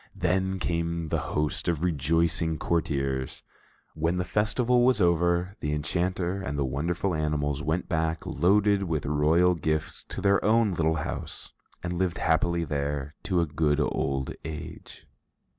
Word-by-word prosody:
Then 95 +1 0
came 85 -1 -2
the 80 - 0
host 75 -1 -2
of 85 -2 0
rejoicing 80 +1 +1
courtiers. 70 -6 -1 0.5
When 80 +3 0
the 90 - 0
festival 115 +7 +2
was 125 -3 +4
over, 85 +1 +2
the 75 0 -2
enchanter 90 +5 -1
and 75 -6 -4
the 70 - +1
wonderful 85 +8 -1
animals 75 -2 -1
went 80 +4 -1
back, 80 0 -1
loaded 100 +2 +3
with 80 -4 -2
royal 80 +5 +3
gifts, 80 -2 -2
to - - -6
their 100 0 +3
own 110 0 +3
little 80 -2 +1
house 75 - -5 0.3
and 90 0 -2
lived 95 -2 0
happily 85 +1 +1
there 70 -1 -2
to 90 -3 +2
a - - +2
good 75 -1 +1
old 70 -2 -1
age. 80 0 -8
85 Hz, 145 wpm, -27 LUFS, 75-90 Hz, 0.5 s, was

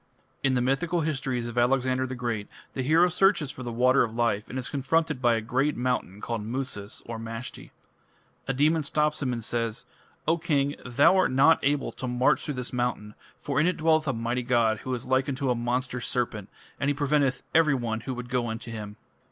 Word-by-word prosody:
In 135 -1 +2
the 125 - +2
mythical 150 +7 +1
histories 135 -6 -2
of 120 +1 -2
Alexander 130 +1 +2
the 130 - -5
Great, 120 -4 -3 0.3
the 130 - -2
hero 160 +7 +4
searches 180 -5 +2
for 130 - -10
the 120 -2 -4
Water 125 +3 +4
of 115 -1 -1
Life, 115 -3 0
and 130 - -5
is 130 - -2
confronted 145 0 0
by 120 -2 +4
a 115 - -1
great 135 +6 0
mountain 125 -5 -2
called 115 -2 -3
Musas 115 -3 -5
(Mashti). 115 +1 -7 0.8
A 135 - 0
demon 155 +4 +3
stops 150 +1 0
him 130 -3 0
and 115 -2 -3
says; 115 -1 -2 0.4
"O 165 +1 +2
king, 145 -4 +1
thou 125 +8 +4
art 185 - +3
not 140 +5 +5
able 145 0 0
to 130 - -6
march 125 +1 +2
through 150 - -3
this 125 0 -5
mountain, 120 -4 -2 0.3
for 145 -1 -1
in 155 - +3
it 180 - 0
dwelleth 160 -1 +2
a 135 - +1
mighty 120 +2 -1
god 120 -3 +2
who 130 - -4
is 120 - -6
like 130 +1 +1
unto 135 -1 -1
a - - +4
monster 125 +1 -2
serpent, 110 -5 -2 0.3
and 140 - +1
he 145 - +1
preventeth 140 -3 +1
everyone 130 -8 +2
who 130 +3 -5
would 125 0 -7
go 125 -1 0
unto 115 +1 -5
him." 105 -2 -6
130 Hz, 205 wpm, -27 LUFS, 120-140 Hz, 0.8 s, not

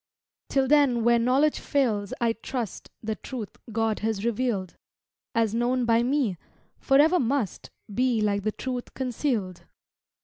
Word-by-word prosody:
Till 270 -1 +2
then 275 -5 +4
where 235 0 +4
knowledge 265 +6 +2
fails 220 -8 0
I 235 -1 +2
trust 230 -1 -5
The 220 0 -1
truth 220 -1 -7 0.2
God 225 0 0
has 220 -1 -2
revealed, 230 -6 -1 0.6
As 225 -2 +2
known 245 +2 +1
by 230 0 +4
me, 250 -7 +1 0.4
forever 300 +6 +4
must 250 -5 -1 0.2
Be 245 0 +2
like 205 -1 +1
the 215 +2 -1
truth 250 +2 -5
concealed. 240 - -2
235 Hz, 135 wpm, -26 LUFS, 215-260 Hz, 0.6 s, then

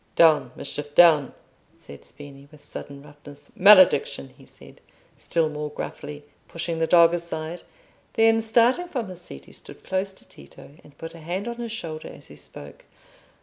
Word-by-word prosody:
"Down, 160 -2 +4
Mischief, 145 +1 -7
down!" 155 -5 +6 0.4
said 70 - -13
Spini, 140 -1 -13
with 150 -2 -16
sudden 140 -1 -9
roughness. 145 -1 -15
"Malediction!" 200 - +5
he - - -18
added, - - -16 0.3
still 165 -2 0
more 150 0 -5
gruffly, 145 0 -7 0.2
pushing 165 0 -4
the 165 - +1
dog 170 -1 +6
aside; 170 0 -5 0.5
then, 225 0 +4
starting 235 +9 +2
from 245 - -4
his 180 -1 -9
seat, 70 - -9
he - - -17
stood - - -12
close 190 +1 -2
to - - -16
Tito, 70 - -15
and 145 -1 -19
put 165 - -8
a 165 - -12
hand 180 +7 -4
on 235 0 -5
his 235 -1 -5
shoulder 160 -8 -6
as - - -13
he - - -13
spoke. 70 0 -11
165 Hz, 170 wpm, -24 LUFS, 145-190 Hz, 0.5 s, down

